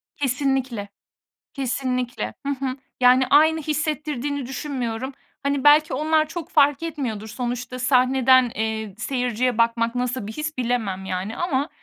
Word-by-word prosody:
Kesinlikle, 265 - -1 0.6
kesinlikle. 255 -2 -2
Hı - - 0 0.2
hı. 260 0 -2 0.2
Yani, 250 +1 +6
aynı 315 +2 +5
hissettirdiğini 295 -2 -2
düşünmüyorum. 260 -1 -4 0.3
Hani, 280 -1 0
belki 300 +2 +6
onlar 310 +3 +2
çok 335 +1 -6
fark 290 -2 +3
etmiyordur. 255 -10 -4
Sonuçta 245 +2 -4
sahneden, 255 0 +4
eee, 220 -2 -3
seyirciye 245 0 -1
bakmak 230 0 +1
nasıl 245 -3 -2
bir - - -5
his 305 +2 -4
bilemem, 225 -6 -1
yani, 190 +4 -4
ama, 300 -4 0
255 Hz, 125 wpm, -23 LUFS, 235-290 Hz, 0.6 s, Yani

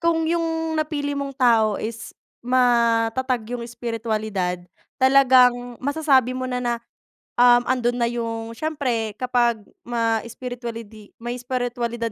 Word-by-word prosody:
kung 335 -1 +1
yung 325 -1 -1
napili 295 -2 -2
mong 275 -1 -4
tao 225 -5 +4
is 225 0 -6 0.3
matatag 240 0 +2
yung 245 - -3
espiritualidad 220 -5 -3 0.4
talagang 255 -2 +4
masasabi 275 -2 +2
mo 255 0 -3
na 250 - -2
na, 240 -1 0 0.7
um, 245 0 +7
andun 245 -2 +1
na 235 -1 +1
yung 230 -1 -4
siyempre 240 -6 -2
kapag 240 -2 +1 0.2
ma-espiritualidi 230 -1 -4
may 240 +1 -4
espiritwalidad 240 -2 -3
245 Hz, 115 wpm, -23 LUFS, 230-260 Hz, 0.7 s, um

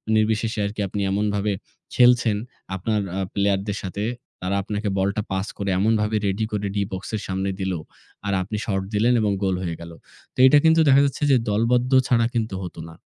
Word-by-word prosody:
নির্বিশেষে 110 +1 +1
আরকি 105 +1 -4
আপনি 100 +2 -3
এমনভাবে 105 0 0 0.4
খেলছেন, 120 -4 +5 0.4
আপনার 105 +3 -1
অ্যা 95 - -2
player 100 -1 +2
দের 105 -1 -2
সাথে 100 +2 -4 0.4
তারা 95 +2 -1
আপনাকে 105 +1 -3
বলটা 100 +2 0
পাস 95 +1 -1
করে 100 -1 -2
এমনভাবে 110 +1 +1
ready 100 +3 0
করে 105 -1 -2
D - - -1
box 95 0 -5
এর 105 - -3
সামনে 95 +1 -2
দিল 95 -1 -1 0.5
আর 100 - 0
আপনি 105 +3 -4
shot 95 -3 -1
দিলেন 115 +4 +3
এবং 105 -1 +1
goal 95 -1 +1
হয়ে 85 -2 -3
গেল। 85 0 -9 0.4
তো - - -28
এটা 145 - +6
কিন্তু 160 0 +5
দেখা 140 0 +7
যাচ্ছে 140 +1 -2
যে 130 - +6
দলবদ্ধ 120 +4 +1 0.2
ছাড়া 115 -2 +3
কিন্তু 110 -4 -1
হত 90 - -7
না। 80 - -13
105 Hz, 190 wpm, -23 LUFS, 95-110 Hz, 0.5 s, দেখা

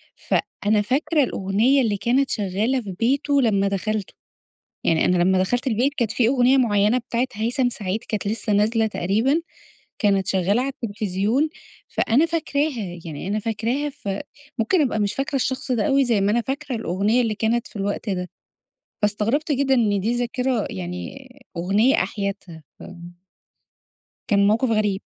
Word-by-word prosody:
فأنا 210 0 0
فاكرة 290 +7 +1
الأغنيّة 225 +5 +2
اللي 215 -5 0
كانت 255 +6 +1
شغّالة 215 +6 0
في 205 -4 -7
بيته 275 +4 +2
لمّا 200 -5 +2
دخلْتُه، 200 +1 -2 0.7
يعني 160 -1 +2
أنا 180 -1 +3
لمّا 190 +1 +3
دخلْت 245 +8 0
البيت 255 +4 +1
كانت 235 -6 0
في 235 -1 +2
أغنية 255 +1 +4
مُعيَّنة 215 -2 +3
بتاعة 245 +1 -1
هيثم 235 +4 0
سعيد 210 -3 -2
كانت 210 -2 -3
لسّه 215 +1 -1
نازلة 220 +2 +2
تقريبًا، 220 - +1 0.6
كانت 200 -3 +2
شغّالة 195 +5 +1
عالتلفزيون، 220 +1 -1 0.4
فأنا 270 +9 +2
فاكراها، 285 - -2
يعني 160 +2 -6
أنا 205 +2 0
فاكراها، 230 +7 -2
ف 240 - -10 0.5
ممكن 230 +11 +2
أبقى 250 -6 0
مش 205 -1 0
فاكرة 275 +1 -2
الشخص 260 0 -1
ده 245 +4 +1
أوي 275 -2 +3
زي 230 -5 +2
ما 200 +1 +2
أنا 240 - +2
فاكرة 270 +1 -4
الأغنيّة 210 +3 +1
اللي 225 -2 -1
كانت 230 +2 0
في - - -13
الوقت 205 +2 -2
ده، 180 -2 -3 0.7
فاستغربت 220 +9 +1
جدًا 270 -1 +2
إن 210 -5 +2
دي 225 +5 0
ذاكرة، 245 -1 -1
يعني 185 +7 -7 0.3
أغنيّة 200 +10 +2
أحيتها. 195 -4 -5 1.7
كان 200 -2 +3
موقف 225 +4 +2
غريب. 210 -2 +1
225 Hz, 150 wpm, -22 LUFS, 200-260 Hz, 1.7 s, أغنية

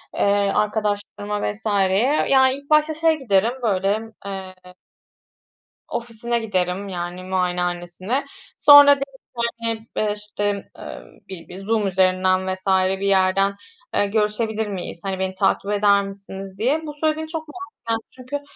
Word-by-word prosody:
eee, 200 0 +2
arkadaşlarıma 210 -1 -1
vs.ye. 205 +5 +1
Ya, 265 -1 +6
ilk 280 +2 -5
başta 305 +1 +4
şeye 320 +1 +2
giderim, 230 -5 +1
böyle, 200 -1 +1 0.3
eee 190 -1 -6 1.3
ofisine 235 0 -3
giderim, 195 -2 -1
yani, 175 0 -5
muayenehanesine. 180 +5 -2 0.3
Sonra 290 -1 +9
derim 275 -1 -7 0.2
ki, 235 - +2
hani, 225 -1 -3
eee, 210 -1 +1
işte, 205 -1 -3
emm, - - -8 0.3
bi 180 -3 -7
bir 180 - -9
Zoom 220 -1 +1
üzerinden 185 0 +2
vs. 185 +1 -16 0.3
bir 200 - -1
yerden, 195 +1 +3 0.4
eee, 205 - +3
görüşebilir 215 +1 0
miyiz, 185 -4 -6
hani, 190 -1 -2
beni 190 0 -2
takip 195 +1 +1
eder 200 -1 +4
misiniz, 195 -1 -9
diye. 265 +9 +1
Bu 295 - -6
söylediğin 315 0 0
çok 315 -1 -6
mantıklı 375 +7 -10
geldi 225 0 -1
çünkü 260 +3 -6
205 Hz, 140 wpm, -22 LUFS, 190-235 Hz, 1.3 s, Sonra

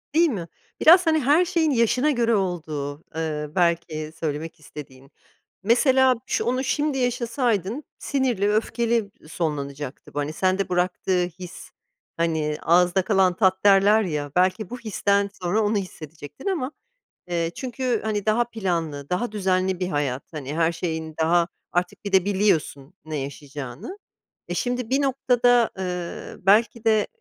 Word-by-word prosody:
Değil 335 +1 +5
mi? 180 - -4 0.3
Biraz, 350 +2 +7
hani, 315 -1 +4
her 300 +6 +4
şeyin 320 -3 +1
yaşına 250 +4 +2
göre 235 -3 +2
olduğu, 155 -6 -3
eee, 155 -2 -3
belki 170 -3 0
söylemek 155 0 -4
istediğin. 135 -3 -12 0.5
Mesela, 255 +4 +4
şo - - -1
onu 255 +2 0
şimdi 290 0 0
yaşasaydın, 240 - -1 0.2
sinirli, 245 -8 0
öfkeli 225 -1 0 0.2
sonlanacaktı 145 -4 -4
bu, 145 - -2
hani, 145 +2 -2
sende 185 +2 0
bıraktığı 180 0 0
his, 180 0 -10 0.5
hani, 160 -2 0
"ağızda 180 +3 +3
kalan 185 -2 +2
tat" 190 -2 +2
derler 200 +2 +6
ya, 150 -6 -3
belki 185 +3 +1
bu 245 - -6
histen 200 -2 0
sonra 185 +5 +1
onu 210 +1 +1
hissedecektin 160 - -8
ama, 310 -8 -1 0.6
eee, 170 -1 -1
çünkü, 250 -2 -2
hani, 210 -2 -2
daha 220 +2 +3
planlı, 170 -11 -3
daha 205 +6 -1
düzenli 185 -2 0
bir 180 - -1
hayat, 140 -5 -1
hani, 145 -1 -5
her 165 0 +3
şeyin 160 -2 -4
daha, 170 +1 +3 0.2
artık 180 +3 -2
bir 200 - -3
de 190 -1 +4
biliyorsun 185 -7 0
ne 155 -1 -4
yaşayacağını. 140 - -7 0.5
Eee, - - -2
şimdi 245 -2 -2
bir 270 +2 +2
noktada, 245 -3 +3
eee, 180 -2 -5
belki 225 +3 +3
de 215 -2 +3
190 Hz, 145 wpm, -24 LUFS, 160-235 Hz, 0.6 s, Biraz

